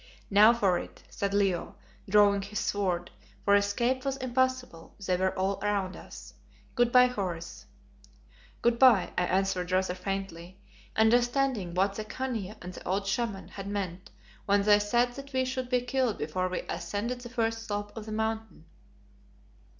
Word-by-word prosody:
"Now 210 Hz, +3 st, +8 dB
for 195 Hz, -7 st, +2 dB
it," -, -, -10 dB
said 200 Hz, 0 st, -2 dB
Leo, 195 Hz, -3 st, 0 dB, 0.3 s
drawing 200 Hz, 0 st, +5 dB
his 205 Hz, +2 st, -6 dB
sword, 185 Hz, -5 st, -1 dB, 0.3 s
for 200 Hz, -, +4 dB
escape 235 Hz, +6 st, +2 dB
was 270 Hz, -1 st, -2 dB
impossible; 255 Hz, -8 st, -2 dB
they 185 Hz, -, +2 dB
were 185 Hz, +1 st, 0 dB
all 190 Hz, +1 st, 0 dB
round 200 Hz, -2 st, -1 dB
us. -, -, -11 dB, 0.4 s
"Good 240 Hz, -1 st, +2 dB
bye, 250 Hz, 0 st, +7 dB
Horace." 185 Hz, -9 st, -4 dB, 1.0 s
"Good 235 Hz, 0 st, +2 dB
bye," 245 Hz, -8 st, +5 dB
I 180 Hz, -, +1 dB
answered 185 Hz, -1 st, 0 dB
rather 185 Hz, -1 st, +1 dB
faintly, 185 Hz, -1 st, -5 dB, 0.4 s
understanding 240 Hz, -3 st, +2 dB
what 195 Hz, +2 st, +2 dB
the 215 Hz, -, -4 dB
Khania 220 Hz, -3 st, -4 dB
and 180 Hz, +1 st, -7 dB
the -, -, -10 dB
old 195 Hz, +2 st, -1 dB
Shaman 200 Hz, -1 st, -2 dB
had 195 Hz, -1 st, -8 dB
meant 190 Hz, -3 st, -4 dB, 0.4 s
when 200 Hz, 0 st, +3 dB
they 205 Hz, 0 st, +6 dB
said 240 Hz, +4 st, +1 dB
that 275 Hz, +1 st, -10 dB
we 260 Hz, 0 st, +1 dB
should 255 Hz, -1 st, -3 dB
be 250 Hz, -1 st, +2 dB
killed 250 Hz, -2 st, 0 dB
before 185 Hz, 0 st, -2 dB
we 185 Hz, -, -2 dB
ascended 205 Hz, +8 st, -4 dB
the 240 Hz, -, -8 dB
first 225 Hz, -2 st, -2 dB
slope 205 Hz, 0 st, -4 dB
of 220 Hz, -1 st, -7 dB
the -, -, -5 dB
Mountain. 220 Hz, 0 st, -3 dB
205 Hz, 160 wpm, -29 LUFS, 190-240 Hz, 1.0 s, Now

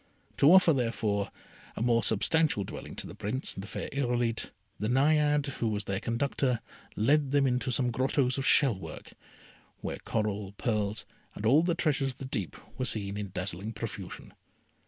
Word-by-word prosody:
To 145 Hz, -, +6 dB
offer, 185 Hz, -3 st, +7 dB
therefore, 110 Hz, -5 st, 0 dB, 0.5 s
a -, -, -5 dB
more 120 Hz, -1 st, +3 dB
substantial 130 Hz, +2 st, +2 dB
dwelling -, -, -8 dB
to -, -, -3 dB
the -, -, -8 dB
Prince 125 Hz, +7 st, -3 dB
and 95 Hz, -, -7 dB
the -, -, -8 dB
fair -, -, -5 dB
Irolite, 120 Hz, -4 st, 0 dB, 0.3 s
the 105 Hz, -, -1 dB
Naiade 145 Hz, +3 st, +3 dB, 0.2 s
who 115 Hz, -, +2 dB
was 105 Hz, -1 st, -1 dB
their 95 Hz, -1 st, -2 dB
conductor 125 Hz, +1 st, 0 dB, 0.4 s
led 140 Hz, +6 st, +3 dB
them 140 Hz, 0 st, +3 dB
into 125 Hz, 0 st, 0 dB
some 125 Hz, 0 st, +1 dB
grottoes 130 Hz, +2 st, +1 dB
of 135 Hz, -, 0 dB
shell 130 Hz, -10 st, +5 dB
work, -, -, -9 dB, 0.7 s
where -, -, -4 dB
coral, 105 Hz, -2 st, -2 dB
pearls, 105 Hz, -1 st, -1 dB, 0.3 s
and 105 Hz, -, -5 dB
all 135 Hz, +8 st, +6 dB
the 170 Hz, 0 st, +1 dB
treasures 145 Hz, -5 st, +1 dB
of -, -, -26 dB
the 135 Hz, -, -6 dB
deep, 110 Hz, -, -3 dB, 0.2 s
were 130 Hz, -, 0 dB
seen 100 Hz, -4 st, -1 dB
in 105 Hz, -1 st, -4 dB
dazzling 95 Hz, +3 st, -3 dB
profusion. 105 Hz, -, -7 dB
120 Hz, 175 wpm, -29 LUFS, 105-140 Hz, 0.7 s, offer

